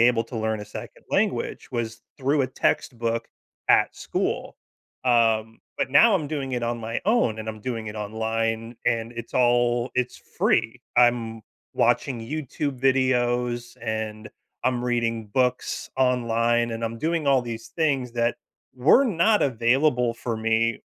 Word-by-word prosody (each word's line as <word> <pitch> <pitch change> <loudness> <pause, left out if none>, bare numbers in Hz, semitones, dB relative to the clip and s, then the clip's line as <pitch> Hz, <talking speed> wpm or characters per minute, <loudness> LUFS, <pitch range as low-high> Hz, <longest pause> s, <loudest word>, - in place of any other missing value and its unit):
able 120 -1 +4
to 115 - -8
learn 110 -1 -1
a - - -6
second 105 - -10
language - - 0
was 115 -1 -3 0.2
through 140 +1 +1
a 130 - +2
textbook 115 -2 -1 0.4
at - - +4
school. - - -3 0.5
Um, 115 -2 +2 0.2
but 130 - -1
now 225 +7 +7
I'm 155 -6 -1
doing 140 -4 -3
it 120 -1 -1
on 120 0 -1
my 115 +1 -3
own, 200 - +2
and 110 0 -5
I'm 110 -1 -6
doing 115 -2 -4
it 105 - -7
online, 115 +2 -2
and 115 0 0
it's 120 0 -8
all 120 0 +2
it's 125 0 -1 0.2
free. - - +2 0.2
I'm 120 -2 +3 0.3
watching 125 -4 +1
YouTube 140 +1 -4
videos, 125 -2 +1
and 110 -1 -4 0.4
I'm 125 -1 +1
reading 115 -2 0
books 125 +3 -1
online, 120 -2 +2
and 115 0 -3
I'm 115 0 -4
doing 160 0 -1
all 135 -2 +4
these 115 -1 -6
things 140 -7 0
that 120 0 0 0.4
were 150 - +5
not 210 0 +3
available 125 0 +2
for 115 -1 -3
me 115 +1 +1
120 Hz, 150 wpm, -25 LUFS, 115-130 Hz, 0.5 s, now